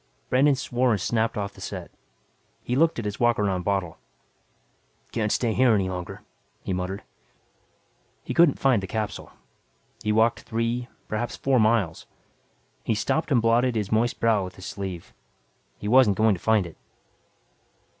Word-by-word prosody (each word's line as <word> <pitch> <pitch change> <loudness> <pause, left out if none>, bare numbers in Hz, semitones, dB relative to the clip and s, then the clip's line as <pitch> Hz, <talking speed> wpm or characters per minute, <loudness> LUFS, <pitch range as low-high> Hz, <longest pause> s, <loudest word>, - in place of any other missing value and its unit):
Brandon 135 +3 +4
swore 125 -2 0
and 105 - 0
snapped 115 +4 0
off 100 -1 -3
the - - -15
set. - - -6 0.7
He 125 - -2
looked 160 +4 +3
at 115 - -4
his 105 0 -4
walk 120 -1 +3
around 95 -3 0
bottle. 95 -3 -2 1.1
"Can't 110 -2 -1
stay 115 -3 +1
here 125 -2 +4
any 95 -2 0
longer," 90 -1 -6 0.4
he 95 - -2
muttered. 90 +2 -4 1.2
He - - -4
couldn't 170 -5 +5
find 130 -6 +3
the 95 - -5
capsule. 110 0 -4 0.7
He 105 - +1
walked 110 +2 +3
three, 115 +2 -2 0.2
perhaps 120 +3 -3
four 135 -2 +1
miles. 110 -6 +1 0.8
He 110 - 0
stopped 155 +9 -1
and 120 -4 +3
blotted 120 +2 +3
his 105 -3 -2
moist 115 +2 +1
brow 110 -3 +2
with 90 - -8
his 95 - -11
sleeve. 95 -4 -6 0.6
He 105 - -6
wasn't 115 -4 +5
going 110 -1 +4
to 90 - -6
find 110 -4 +2
it. 85 - -11
110 Hz, 160 wpm, -25 LUFS, 100-120 Hz, 1.2 s, couldn't